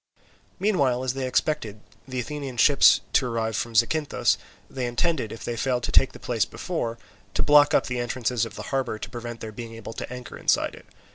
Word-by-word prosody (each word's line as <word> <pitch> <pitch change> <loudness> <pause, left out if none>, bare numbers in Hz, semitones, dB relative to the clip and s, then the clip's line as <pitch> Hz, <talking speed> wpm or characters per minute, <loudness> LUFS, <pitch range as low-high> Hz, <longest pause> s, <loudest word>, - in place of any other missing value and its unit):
Meanwhile, 140 -11 +2
as 130 -1 0
they 135 -1 -2
expected 115 -6 -1 0.3
the 130 -1 -3
Athenian 135 +1 -5
ships 140 +4 +6
to 130 - +3
arrive 115 -2 -1
from 115 +5 -3
Zacynthus, 145 +7 +2 0.3
they 130 -2 -3
intended, 125 -1 0
if 115 - -8
they 120 - -2
failed 125 +1 0
to - - -2
take 135 - +4
the - - -11
place 115 -4 0
before, 120 -11 -3 0.4
to - - +2
block 145 0 +6
up - - +3
the 125 -1 -3
entrances 120 -1 -1
of 115 - -5
the - - -6
harbour 135 -5 0
to - - -7
prevent 120 -1 -7
their 110 - -6
being 115 +1 -8
able 115 0 -8
to - - -6
anchor 125 -1 -8
inside - - +2
it. - - -14
125 Hz, 205 wpm, -25 LUFS, 115-135 Hz, 0.4 s, ships